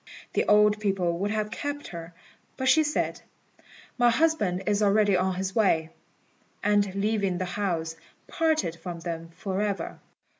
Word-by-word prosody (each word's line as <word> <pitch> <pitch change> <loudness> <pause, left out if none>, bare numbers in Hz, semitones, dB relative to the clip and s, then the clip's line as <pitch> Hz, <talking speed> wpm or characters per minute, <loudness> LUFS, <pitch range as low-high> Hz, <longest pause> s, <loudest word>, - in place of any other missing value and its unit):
The - - +1
old 210 0 +5
people 185 -5 0
would 200 +2 0
have 215 0 -1
kept 290 +4 -4
her, 170 -1 -8 0.4
but 260 - -1
she 305 +4 +6
said, 300 0 -1 0.8
"My 240 0 +6
husband 230 - +1
is 205 0 +1
already 205 -1 +4
on 185 0 +1
his 190 +1 -3
way," 165 -7 +2 0.7
and, 205 -2 +2
leaving 200 -2 0
the 185 - -2
house, 175 -4 -2 0.3
parted 315 - 0
from 170 -1 -7
them 165 -1 -5
for 190 +3 -3
ever. 205 -2 -3
200 Hz, 150 wpm, -27 LUFS, 180-215 Hz, 0.8 s, she